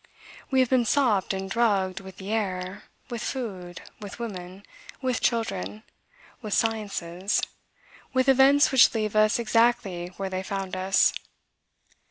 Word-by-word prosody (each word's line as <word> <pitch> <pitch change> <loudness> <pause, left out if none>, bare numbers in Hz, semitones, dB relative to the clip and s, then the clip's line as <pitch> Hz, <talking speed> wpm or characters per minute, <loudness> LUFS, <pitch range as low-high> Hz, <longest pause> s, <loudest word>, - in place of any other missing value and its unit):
We 265 -1 +3
have 255 - +1
been 255 -2 +4
sopped 225 -7 +2
and 190 0 -3
drugged 195 -4 +1
with 190 -1 -12
the 195 +2 -6
air, 190 -3 -3 0.3
with 235 -2 -4
food, 190 -11 -5 0.2
with 205 -2 -8
woman, 190 -4 -7 0.3
with 255 -3 -1
children, 215 -2 -1 0.6
with 215 -3 -2
sciences, 200 -4 -1 0.7
with 260 0 +1
events 270 +2 +5
which 260 -3 +6
leave 215 -1 -1
us 215 0 +4
exactly 230 -6 +1
where 195 -1 -4
they 185 0 -2
found 195 -1 -4
us. 190 +1 +3
210 Hz, 135 wpm, -26 LUFS, 190-235 Hz, 0.7 s, which